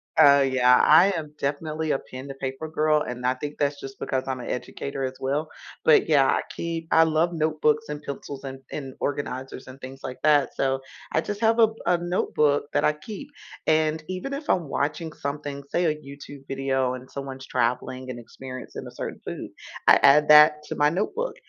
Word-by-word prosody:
Uh, 140 -2 +7
yeah, 125 -1 +5
I 175 +6 +7
am 155 -3 -5
definitely 155 +2 -2
a 135 - +1
pen 130 +2 -10
to - - -5
paper 135 +3 -5
girl, 155 -1 +2
and 125 0 -6
I 125 +1 +2
think 145 +3 -7
that's 145 0 0
just 135 -1 -9
because 130 0 -1
I'm 130 -1 -2
an 120 - -7
educator 135 +2 -4
as 130 0 -2
well, 145 +4 -1 0.4
but, 155 - +5
yeah, 140 -3 +5
I - - +2
keep 165 -1 -4
I 160 - +6
love 160 +2 +1
notebooks 155 -1 +1
and 150 0 -5
pencils 140 -1 -7
and 135 0 -7
and 135 -3 -6
organizers 135 -2 -4
and 130 +1 -11
things 135 0 -9
like 130 -1 -6
that, 150 -2 +3
so, 135 0 0 0.3
I 155 - +3
just 205 +4 -5
have 225 +1 +3
a 225 -1 +6 0.2
a 175 -1 +3
notebook 150 -4 +1
that 145 - +2
I 150 - +3
keep, 215 - -9 0.4
and 155 0 +2
even 185 +10 -4
if 290 +2 -6
I'm 170 -5 +2
watching 150 +3 -2
something 140 0 -5
say 175 +4 +1
a 155 - +3
YouTube 140 -1 -12
video 135 -1 0
and 130 0 -11
someone's 135 -1 -7
traveling 125 +2 -1
and 125 - -5
experiencing 130 +2 -9
a - - -9
certain - - -5
food, - - -6 0.4
I - - +8
add 150 +2 +6
that 150 0 +8
to - - -6
my 145 0 +3
notebook. 215 - -2
145 Hz, 200 wpm, -25 LUFS, 135-155 Hz, 0.4 s, I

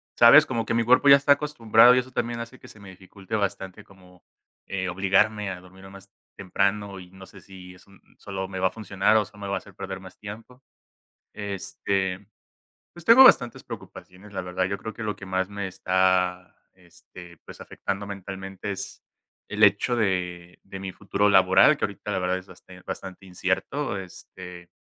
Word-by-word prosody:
¿sabes?, - - +8
como 115 -1 -2
que - - -2
mi 115 0 +2
cuerpo 130 +3 +5
ya 140 - +10
está 140 +1 +4
acostumbrado, 125 -5 +4
y - - +4
eso 130 +1 -6
también, 120 -1 -3
hace 115 +2 -9
que - - -15
se 110 - -16
me 100 -1 -12
dificulte 95 +2 -9
bastante, 100 -2 -3
como, 90 -2 -20 0.4
eh, 95 -1 -3
obligarme 100 +3 +1
a 90 - -7
dormirme 95 +1 -15
más 100 0 -14 0.3
temprano, 100 +1 -1
y 90 0 -14
no 95 0 -13
sé 95 - -15
si 90 -1 -13
es 90 - -20
un 100 - -20 0.2
sólo 95 -1 -6
me 95 0 -6
va 95 - +3
a - - -2
funcionar, 105 0 +1
o 105 - +1
solo 105 +1 -17
me 100 - -5
va 100 - -1
a - - -1
hacer 100 -3 -12
perder 95 0 -6
más 95 -1 -14
tiempo. 115 +5 -11 0.7
Este, 100 -1 -3 0.7
pues 175 -1 -13
tengo 260 +3 +8
bastantes 125 - +4
preocupaciones, 95 +3 -11
la 95 - -4
verdad. 90 +1 -2
Yo 100 +1 -4
creo 110 +3 -7
que 115 - -9
lo 105 -1 -3
que 100 - -11
más 95 0 -1
me 100 -1 -5
está, 90 0 0 0.2
este, 90 -1 -16
pues, - - -14
afectando 100 +1 -5
mentalmente, 95 0 -7
es 95 - -7 0.5
el 105 +1 +3
hecho 105 +4 +3
de 90 -4 -2
de 95 0 -10
mi 95 -1 -6
futuro 100 +2 0
laboral, 100 - +5
que - - -3
ahorita, - - -5
la - - -1
verdad, 90 +1 -1
es 95 - -13
basten 90 0 -16
bastante 95 0 -8
incierto. 95 +8 -2
Este 90 -1 -11
95 Hz, 195 wpm, -25 LUFS, 95-105 Hz, 0.7 s, ya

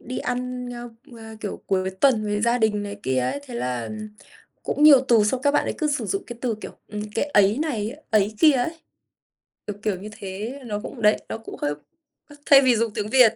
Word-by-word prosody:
đi 255 +1 -5
ăn, 250 0 -3
ơ, 240 0 -7 0.3
ơ, - - -11 0.2
kiểu, 205 - -5
cuối 190 -1 0
tuần 215 +3 +2
với 205 0 -1
gia 235 +1 +2
đình 210 -2 +1
này 205 0 -6
kia 130 0 0
ấy, 125 - -1
thế 245 - -9
là 125 - -3 0.7
cũng 295 - -1
nhiều 285 -4 +9
từ 225 -3 +5
xong 250 +4 0
các 285 - +4
bạn 290 - +2
ấy - - -1
cứ 305 - 0
sử 295 0 -1
dụng 395 0 -2
cái 240 -1 -8
từ, 235 -3 0
kiểu, - - -7 0.2
ừm, 210 -1 -5
cái 225 - +1
ấy 205 -4 +3
này, 260 -5 -2
ấy 215 0 +2
kia 310 -2 +7
ấy. 280 +6 -1 0.9
Kiểu 210 - -3
kiểu 210 -3 0
như 210 +2 -8
thế, 205 +8 -6
nó 210 -2 -3
cũng 240 - -8
đấy, 210 0 +5
nó - - -3
cũng 225 - -10
hơi, 145 0 0 0.5
ơ, 290 - -14
thay 275 -1 +8
vì 255 -3 +4
dùng 225 -1 0
tiếng 210 0 -3
Việt 250 -3 +6
225 Hz, 230 wpm, -24 LUFS, 205-255 Hz, 0.9 s, nhiều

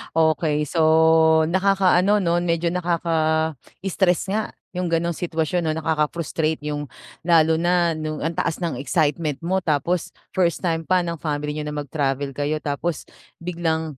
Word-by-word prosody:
Okey. 155 -2 +2
So, 165 +3 -1 0.7
nakakaano 195 +1 +3
'no, 170 -1 +1
medyo 170 -1 0
nakaka-stress 170 +2 0
nga 215 +2 0 0.3
yung 180 -1 -2
gano'ng 170 0 0
sitwasyon 165 0 -1
'no, 155 - +1
nakaka-frustrate 160 0 -1
yung 145 0 -3 0.4
lalo 160 -2 +4
na 175 0 +2
nung 155 -1 -4
ang 165 - -1
taas 165 - -1
ng 160 -7 -2
excitement 150 0 0
mo 185 +3 +1
tapos 160 +3 0 0.2
first 175 -4 +1
time 165 -2 -1
pa 185 -1 +3
ng 170 -1 -4
family 150 -1 -2
niyo 150 - -3
na 150 - -4
mag-travel 140 -1 -2
kayo 145 +1 -1
tapos 150 +3 -2 0.4
biglang 160 -4 -2
165 Hz, 140 wpm, -22 LUFS, 155-175 Hz, 0.7 s, lalo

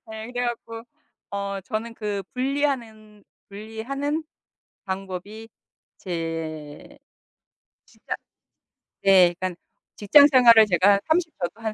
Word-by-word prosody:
예. 220 0 -7
그래 245 0 -1
갖고 230 -1 -6 0.5
어 200 0 -4
저는 225 +3 -5
그 210 -3 -4
분리하는 245 -6 -3 0.2
분리하는 245 +9 -4 0.6
방법이 195 +3 -6 0.5
제 165 -4 -6 0.9
직장 - - -7 0.9
네 185 -3 +6
그러니까 185 -2 -4 0.4
직장 285 +8 +6
생활을 235 -5 +7
제가 200 +1 +3
30 325 0 +1
저도 175 +6 -4
한 220 -1 -3
215 Hz, 195 characters per minute, -24 LUFS, 195-240 Hz, 0.9 s, 생활을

